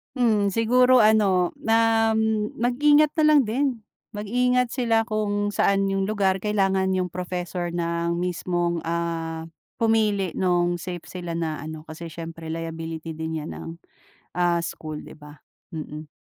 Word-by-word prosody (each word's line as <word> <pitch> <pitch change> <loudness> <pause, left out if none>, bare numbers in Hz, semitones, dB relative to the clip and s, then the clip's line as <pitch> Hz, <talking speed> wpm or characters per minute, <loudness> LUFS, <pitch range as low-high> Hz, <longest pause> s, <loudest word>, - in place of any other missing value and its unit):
Mhm, 220 -5 +2
siguro 250 +3 +5
ano 200 -5 +3
na 225 0 +3
m 220 -1 0
mag-ingat 290 +5 +4
na - - +4
lang 295 - +7
din. 250 +6 0 0.5
Mag-ingat 250 +4 +1
sila 230 -3 +2
kung 205 -2 -1
saan 195 0 +2
yung 195 0 0
lugar 195 -3 +1
kailangan 195 -2 +1
yung 180 -2 -1
professor 180 0 -4
na 170 0 -1
ang 170 - 0
mismong, 175 -1 -1
ah, 165 -1 -2 0.3
pumili 215 -5 +1
nung 175 -1 +1
safe 175 -2 -6
sila 175 -2 -6
na 160 -2 -2
ano, 155 0 -7
kasi 160 +1 -8
siyempre 165 0 -8
liability 165 0 -5
din 160 0 -4
yan 155 - -6
ng, - - -8 0.7
ah, 175 -1 +2
school 155 -2 -6
di - - -12
ba? 150 0 -14 0.3
Mm. 155 -1 -7
185 Hz, 145 wpm, -24 LUFS, 170-220 Hz, 0.7 s, lang